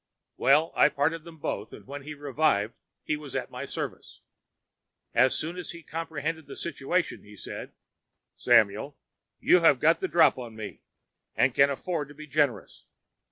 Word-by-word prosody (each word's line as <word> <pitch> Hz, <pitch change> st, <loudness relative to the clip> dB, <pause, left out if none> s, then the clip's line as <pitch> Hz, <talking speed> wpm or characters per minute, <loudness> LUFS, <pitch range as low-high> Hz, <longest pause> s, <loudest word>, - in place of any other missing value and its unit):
Well, 150 Hz, +4 st, +4 dB
I -, -, +6 dB
parted 155 Hz, +3 st, -1 dB
them 170 Hz, -1 st, -12 dB
both, 150 Hz, -, -4 dB
and -, -, -12 dB
when 140 Hz, +2 st, -7 dB
he 150 Hz, +2 st, -8 dB
revived 140 Hz, -7 st, +1 dB, 0.3 s
he 155 Hz, -, 0 dB
was 150 Hz, -3 st, -8 dB
at -, -, -3 dB
my -, -, -5 dB
service. -, -, -6 dB, 0.9 s
As 130 Hz, 0 st, +4 dB
soon 165 Hz, +3 st, -4 dB
as 180 Hz, -, -6 dB
he 170 Hz, -1 st, -8 dB
comprehended 160 Hz, -1 st, -4 dB
the -, -, -8 dB
situation, 170 Hz, +2 st, -2 dB
he 105 Hz, 0 st, -15 dB
said: -, -, -7 dB, 0.6 s
"'Samuel, 110 Hz, +7 st, +3 dB, 0.4 s
you 180 Hz, -, +5 dB
have 150 Hz, -6 st, +5 dB
got 165 Hz, +4 st, +4 dB
the 190 Hz, -, -1 dB
drop 170 Hz, -6 st, +4 dB
on 120 Hz, -3 st, -8 dB
me 110 Hz, -2 st, -8 dB, 0.5 s
and -, -, +3 dB
can 140 Hz, 0 st, +5 dB
afford 150 Hz, +2 st, -3 dB
to 145 Hz, -, -14 dB
be 155 Hz, +1 st, -9 dB
generous. 145 Hz, -, -1 dB
145 Hz, 165 wpm, -28 LUFS, 135-165 Hz, 0.9 s, I